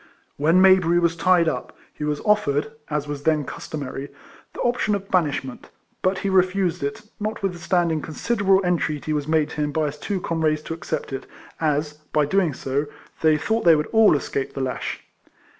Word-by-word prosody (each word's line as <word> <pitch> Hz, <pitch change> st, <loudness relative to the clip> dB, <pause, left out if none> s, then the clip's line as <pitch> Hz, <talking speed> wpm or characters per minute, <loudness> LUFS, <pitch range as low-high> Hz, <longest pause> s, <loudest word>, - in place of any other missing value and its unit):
When 160 Hz, +5 st, +4 dB
Mayberry 185 Hz, -3 st, +5 dB
was 170 Hz, -1 st, +2 dB
tied 175 Hz, 0 st, +3 dB
up, -, -, -3 dB, 0.2 s
he -, -, -7 dB
was 150 Hz, -1 st, -1 dB
offered, 150 Hz, -9 st, +1 dB, 0.2 s
as 150 Hz, -1 st, -2 dB
was 145 Hz, -1 st, -5 dB
then 155 Hz, -1 st, +1 dB
customary, 140 Hz, -1 st, -6 dB, 0.5 s
the -, -, -8 dB
option 240 Hz, -3 st, +1 dB
of 195 Hz, 0 st, -7 dB
banishment; 145 Hz, -7 st, -1 dB, 0.3 s
but 185 Hz, +1 st, +1 dB
he -, -, +2 dB
refused 185 Hz, -2 st, +2 dB
it, 140 Hz, +10 st, -3 dB, 0.2 s
notwith 205 Hz, -3 st, -2 dB
standing 170 Hz, -2 st, +1 dB
considerable 195 Hz, +4 st, +1 dB
entreaty 155 Hz, -3 st, 0 dB
was 145 Hz, -1 st, -2 dB
made 155 Hz, -1 st, +2 dB
to -, -, -7 dB
him 150 Hz, -1 st, 0 dB
by 155 Hz, +1 st, 0 dB
his 150 Hz, 0 st, -4 dB
two 200 Hz, +3 st, -2 dB
comrades 155 Hz, -3 st, 0 dB
to 165 Hz, -, -5 dB
accept 165 Hz, -3 st, -4 dB
it, 135 Hz, -, -5 dB, 0.3 s
as, 150 Hz, -1 st, 0 dB, 0.2 s
by 150 Hz, -, +4 dB
so 145 Hz, -, -3 dB
doing, 180 Hz, -6 st, +2 dB, 0.7 s
they 155 Hz, -1 st, +4 dB
thought 220 Hz, +9 st, -1 dB
they 170 Hz, -2 st, +7 dB
all 215 Hz, +9 st, +3 dB
would 155 Hz, -, +5 dB
escape 140 Hz, -1 st, -4 dB
the 135 Hz, -, -3 dB
lash. 130 Hz, -1 st, -3 dB
160 Hz, 180 wpm, -23 LUFS, 150-185 Hz, 0.7 s, they